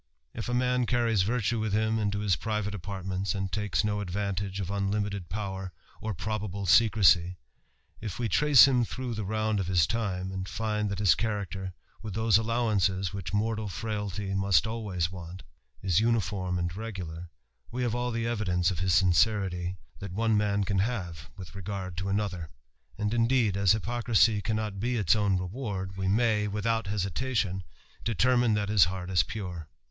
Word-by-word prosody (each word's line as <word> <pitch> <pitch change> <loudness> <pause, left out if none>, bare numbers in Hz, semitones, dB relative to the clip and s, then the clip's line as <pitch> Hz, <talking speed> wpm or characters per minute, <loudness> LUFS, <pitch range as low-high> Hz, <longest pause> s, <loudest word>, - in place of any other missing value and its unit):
If 115 - -5
a 120 - 0
man 125 -1 +1
carries 115 -5 +2
virtue 115 +2 0
wilh 110 -2 -1
him 110 +1 +1
into 105 -1 -1
his 100 -4 +2
private 105 +4 -2
apartments, 95 0 -3
and 95 -1 -2
lakes 105 0 0
no 105 -1 0
advantage 100 0 -3
of 95 -1 -3
unlimited 100 -2 -2
power 95 0 -4 0.3
or 110 -2 -3
probable 100 0 -3
secrecy; 95 -3 +5 0.6
if 105 -4 -5
we 120 - -1
trace 140 +6 +7
him 125 -3 +3
through 125 +1 -4
the 110 -1 -3
round 110 +1 0
of 95 - -2
his 90 -4 +4
time, 95 -4 -2
and 95 -1 -5
find 105 +2 -1
that 100 - -3
his 100 -2 +5
character, 100 -4 -3 0.3
with 105 -4 -6
those 110 -2 +4
allowances 105 -5 0
which 100 -3 -5
mortal 110 0 -1
frailty 105 +1 -3
must 95 -4 +3
always 100 -7 -2
want, 90 0 -9 0.4
is 95 -2 +3
uniform 100 -5 0
and 85 -1 -2
regular, 90 -6 -6 0.4
we 125 +2 -3
have 120 -3 0
all 120 0 -1
the 115 -1 -2
evidence 95 -6 +1
of 90 - -4
his 90 -1 +1
sincerity, 95 -1 +2 0.2
that 100 -3 -6
one 110 +3 +1
man 105 -1 +1
can 100 0 0
have 90 -7 -3
with 95 -2 -9
regard 95 -1 -5
to 95 +2 -2
another: 95 -5 -2 0.5
and, 105 0 -1
indeed, 115 -3 +2
as 100 -1 +4
hypocrisy 115 -1 +2
cannot 110 -2 -2
be 120 +4 0
its 105 -3 +3
own 100 -3 +2
reward, 95 -1 -4
we 95 0 -2
may, 105 0 +2
without 110 +2 -1
besitKtion, 100 0 -1 0.4
determine 120 +1 +3
that 105 -1 0
his 105 -5 +6
heart 90 +1 -5
is 90 - +5
pure. 90 -7 -6
100 Hz, 170 wpm, -28 LUFS, 95-110 Hz, 0.6 s, trace